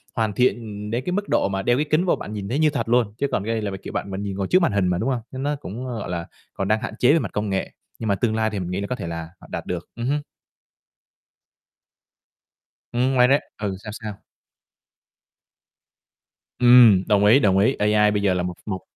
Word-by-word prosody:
hoàn 110 -2 0
thiện 105 -3 -1
đến 120 +3 -1
cái - - -1
mức 205 +1 -2
độ - - +2
mà 95 0 -2
đeo 120 +5 +2
cái 150 - +1
kính 160 +4 +2
vô 180 - +3
bạn 105 - -8
nhìn 100 -2 -5
thấy 135 +6 -1
như 155 - +4
thật 140 -5 -3
luôn, 120 -4 +2
chứ 140 - 0
còn - - 0
cái 115 - -1
này 110 - -1
là, 105 -2 -3
kiểu, - - -7
bạn 100 - -3
mà 95 - -4 0.2
ngồi 95 -1 -2
trước 185 - +4
màn 170 - +2
hình 100 -3 +1
mà, 90 - +1
đúng 115 +8 -1
hông? 125 -3 -1
Nên 130 0 -5
nó 145 +1 0
cũng, 130 -2 -7
ơ, 120 -3 -4
gọi 100 - -6
là, 85 -1 -4 0.3
còn 95 - -3
đang 110 +1 +1
hạn 120 - -5
chế 125 +3 +5
về 165 - +4
mặt - - -4
công 105 0 -2
nghệ, 95 -1 -2 0.3
nhưng 115 - -4
mà 100 - +3
tương 110 +2 0
lai 110 0 +1
thì 105 -2 -4
mình 90 -1 -4
nghĩ 95 +2 -2
là 100 - -3
có 125 - -2
thể 85 - -6
là 85 -1 -5
họ - - -15
đạt - - -4
được. 90 -2 -5
Ừm 120 - -4
hưm. 145 +2 0 2.7
Ừm, 125 +2 +1
ngoài 125 -1 +5
ra 140 +3 +4 0.2
ừ, 100 -2 -3
sao, 105 - -6
sao? 110 -3 -8 2.4
Ừm! 120 -6 +7
Đồng 105 -1 +3
ý, 110 +6 +7
đồng 95 -7 +3
ý. 110 +7 +3
AI 105 0 +3
bây 105 -1 0
giờ 100 -2 +2
là 90 -1 -1
một 90 0 -3
một 95 -4 -4
110 Hz, 250 wpm, -23 LUFS, 100-125 Hz, 2.7 s, Ừm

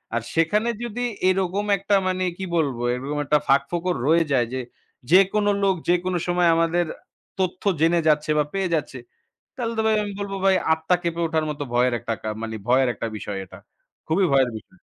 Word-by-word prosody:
আর 120 - 0
সেখানে 210 +8 +2
যদি 240 +1 -4 0.3
এরকম 190 +2 0
একটা 200 +2 +1
মানে 185 0 -1
কি 190 - -4
বলব, 140 -6 0 0.2
এরকম 140 +4 -4
একটা 150 +2 +3
ফাঁকফোকর 170 +6 +1
রয়ে 165 +2 +4
যায় 125 -4 +2
যে 130 - -2 0.5
যেকোনো 195 +3 +4
লোক 195 -1 +3
যেকোনো 180 +1 +1
সময় 175 -1 +3
আমাদের 165 +1 +1 0.5
তথ্য 185 -1 -2 0.2
জেনে 165 +1 +4
যাচ্ছে, 155 0 +2
বা 150 - +4
পেয়ে 195 -2 -1
যাচ্ছে। 140 -4 -4 0.6
তাহলে 235 -3 -2
তো - - +2
ভাই 220 0 +3
আমি 205 - -5
বলব 200 -1 -4
ভাই 190 -1 +5 0.2
আত্মা 160 +3 0
কেঁপে 170 0 -2
ওঠার 160 -1 0
মত 150 0 -7
ভয়ের 125 0 +2
একটা 115 0 -3
কা 110 - -4
মানে 110 0 -4
ভয়ের 130 +1 +3
একটা - - -4
বিষয় 100 -1 -5
এটা। 90 - -14 0.5
খুবই 185 +5 +2
ভয়ের 135 -2 +4
বিষয়। 185 +12 -13
170 Hz, 185 wpm, -23 LUFS, 140-190 Hz, 0.6 s, ভাই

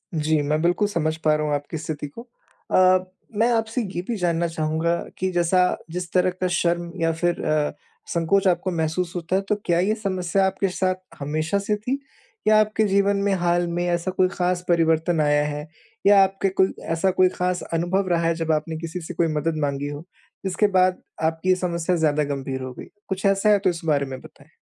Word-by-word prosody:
जी, 155 0 +1
मैं 150 +2 0
बिल्कुल 175 +4 +2
समझ 160 -5 -1
पा 155 -1 +4
रहा 150 0 -1
हूँ 150 - 0
आपकी 145 +3 -5
स्थिति 150 -1 -5
को 145 +11 -10 0.5
अ, 185 0 +5 0.3
मैं 230 +3 +3
आपसे 225 +2 0
ये 175 - -1
भी 235 - -1
जानना 170 -2 0
चाहूँगा 160 +1 0 0.2
कि 185 - -1
जैसा 175 +1 +2 0.3
जिस 180 0 -5
तरह 185 0 +3
का 185 - +2
शर्म 170 0 0
या 165 0 +3
फिर 175 +1 -1
अ, 155 -1 +1 0.4
संकोच 190 +4 +2
आपको 185 +1 +1
महसूस 160 +2 -1
होता 175 +1 -2
है 195 - +2
तो 210 - +3
क्या 170 -1 +2
ये 200 +4 +2
समस्या 190 -3 0
आपके 195 +1 -1
साथ 185 0 0 0.2
हमेशा 155 +6 -1
से 210 +1 0
थी 250 +7 -3 0.5
या 215 0 +6
आपके 215 0 +2
जीवन 200 +1 +2
में 200 -1 +2
हाल 175 0 +1
में 175 +1 -2
ऐसा 175 +1 0
कोई 185 0 +2
ख़ास 180 0 -1
परिवर्तन 165 0 +2
आया 145 0 +3
है? 150 +1 -4 0.4
या 200 -1 +7
आपके 195 0 0
कोई 190 0 +2 0.2
ऐसा 175 +3 +2
कोई 185 0 +4
ख़ास 180 0 -2
अनुभव 175 +4 0
रहा 170 -1 +2
है 165 - +2
जब 165 -1 -1
आपने 155 +1 -1
किसी 165 +2 -5
से 170 +2 -7
कोई 170 0 +1
मदद 155 +2 -1
माँगी 140 0 -1
हो? 145 +1 -6 0.4
इसके 190 +3 +2
बाद 185 0 +3 0.2
आपकी 160 +3 0
ये 185 - +6
समस्या 180 -1 -1
ज़्यादा 155 -2 +2
गंभीर 135 -2 -4
हो 130 -1 -6
गई। - - -9 0.2
कुछ 190 +1 -3
ऐसा 195 +2 +3
है 205 -1 +5
तो 190 - +2
इस 170 -2 -4
बारे 145 -3 +2
में 130 -1 -7
बताएँ? - - -17
175 Hz, 210 wpm, -23 LUFS, 160-190 Hz, 0.5 s, या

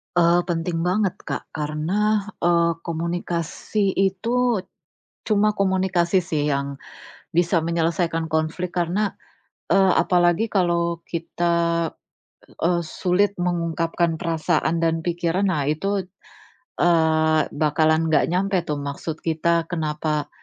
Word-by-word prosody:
Eee, 175 0 +4
penting 165 -1 -2
banget, 190 +1 +1
Kak, - - -5
karena, 175 +8 0 0.2
eee, 170 -1 +3
komunikasi 170 +4 -2
itu 230 +3 +1 0.6
cuma 210 0 +2
komunikasi 190 -2 +2
sih 165 -4 -2
yang 140 0 -2 0.6
bisa 170 -1 +2
menyelesaikan 165 0 0
konflik 160 +3 -1
karena, 180 +4 0 0.6
eee, 195 -1 +5
apalagi 175 +3 +3
kalau 170 -3 +1
kita, 170 0 0 0.7
eee, 170 +1 +1
sulit 180 +4 0
mengungkapkan 170 -1 0
perasaan 165 0 0
dan 165 -1 0
pikiran. 175 +2 0
Nah 145 -3 -1
itu, 195 +6 0 0.8
eee, 160 -2 +3
bakalan 155 +2 +2
enggak 160 -2 +3
nyampai 190 +1 +1
tuh 150 - 0
maksud 145 +3 -5
kita, 165 +1 +1
kenapa, 155 -3 -2
170 Hz, 105 wpm, -23 LUFS, 160-185 Hz, 0.8 s, eee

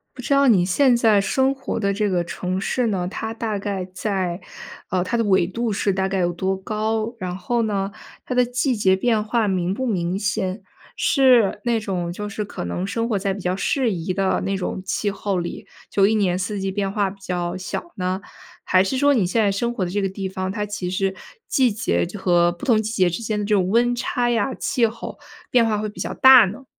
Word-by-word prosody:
不 255 - -8
知 280 - +1
道 275 -1 +4
你 190 -6 +5
现 245 +7 +3
在 220 -4 +4
生 265 +7 +1
活 270 - -4
的 200 -2 0
这 210 0 0
个 175 -2 +1
城 180 +2 -3
市 245 +4 0
呢， 185 -4 -1
它 220 +3 -4
大 225 -2 -3
概 195 -2 -3
在 185 -2 -2 0.5
呃， 180 -1 +1
它 185 +6 -1
的 230 - +1
纬 190 -4 +3
度 225 +4 -2
是 200 0 0
大 190 0 0
概 190 0 -1
有 175 -1 +1
多 190 +2 -1
高？ 215 +3 -2
然 180 -1 -3
后 235 +6 -1
呢， 200 -2 -1 0.3
它 255 - -3
的 250 0 +4
季 250 +2 0
节 190 -3 +3
变 220 +1 +1
化 220 +1 0
明 185 -2 0
不 260 +6 -2
明 180 -4 -1
显？ 195 -1 -2 0.4
是 250 -8 +4
那 235 -1 +2
种 180 -5 -3
就 210 +3 -5
是 210 +1 -4
可 200 - -6
能 130 - -3
生 230 +3 -2
活 215 -4 0
在 195 0 -1
比 200 - -6
较 180 0 -1
适 255 +4 +1
宜 180 -1 -2
的 190 0 0
那 195 0 -1
种 190 0 -4
气 205 +2 -1
候 195 -1 -2
里， 175 +4 -5 0.2
就 195 -1 +3
一 220 - +2
年 185 -4 +1
四 195 +2 -3
季 195 0 -1
变 195 -1 -2
化 200 -1 +1
比 195 +1 -11
较 175 -1 -2
小 265 - -5
呢？ 185 +1 -2 0.4
还 185 - +4
是 260 +7 -1
说 285 +1 +4
你 225 -7 +2
现 220 +6 +1
在 205 - +3
生 235 +5 -1
活 200 - -2
的 175 - -4
这 205 +2 -1
个 195 - +1
地 190 0 -4
方， 185 0 -3
它 210 0 -3
其 200 -3 -4
实 190 +1 -1 0.3
季 255 -3 +3
节 85 - 0
就 205 - -7
和 175 -1 +3
不 175 - -9
同 220 -4 +4
季 220 +1 -4
节 185 -5 +3
之 175 +7 -4
间 215 -1 -2
的 210 - -1
这 210 - +2
种 185 -2 +2
温 240 +2 +3
差 240 0 -1
呀， 235 +2 +1
气 235 -2 +1
候 225 +1 -7 0.3
变 245 -2 +4
化 215 -2 0
会 215 0 -2
比 210 - -10
较 - - -3
大 260 -3 +8
呢？ 210 +8 -6
200 Hz, 255 characters per minute, -22 LUFS, 185-230 Hz, 0.5 s, 大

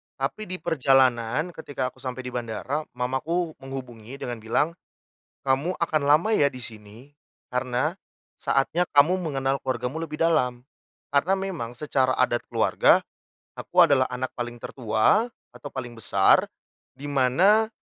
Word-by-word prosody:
Tapi 145 +10 -3
di 185 - -3
perjalanan 135 -1 +2
ketika 140 -6 -4
aku - - -23
sampai 130 -1 -5
di 125 - -6
bandara, 125 +6 -3
mamaku 155 +8 -1
menghubungi 130 -3 -8
dengan 120 -4 -5
bilang, 115 +8 0 0.7
"Kamu 135 +7 +1
akan 160 -3 0
lama 155 +9 +4
ya, 140 -1 +3
di 125 - -8
sini, 110 +4 -10 0.4
karena 125 +7 -1 0.4
saatnya 140 +5 +1
kamu 150 +6 +5
mengenal 140 -6 -1
keluargamu 125 +3 -3
lebih 155 -1 -7
dalam." 125 -7 +2 0.5
Karena 145 +7 +2
memang 190 -12 -3
secara 130 -1 0
adat 120 -1 +1
keluarga, - - +3 0.6
aku - - +4
adalah 135 -2 +4
anak 130 +1 -2
paling 120 -1 -5
tertua 115 - +2 0.2
atau 145 - -10
paling 120 -3 -6
besar, 100 -3 +4 0.5
di 140 +3 -9
mana 180 - +3
135 Hz, 135 wpm, -25 LUFS, 125-155 Hz, 0.7 s, kamu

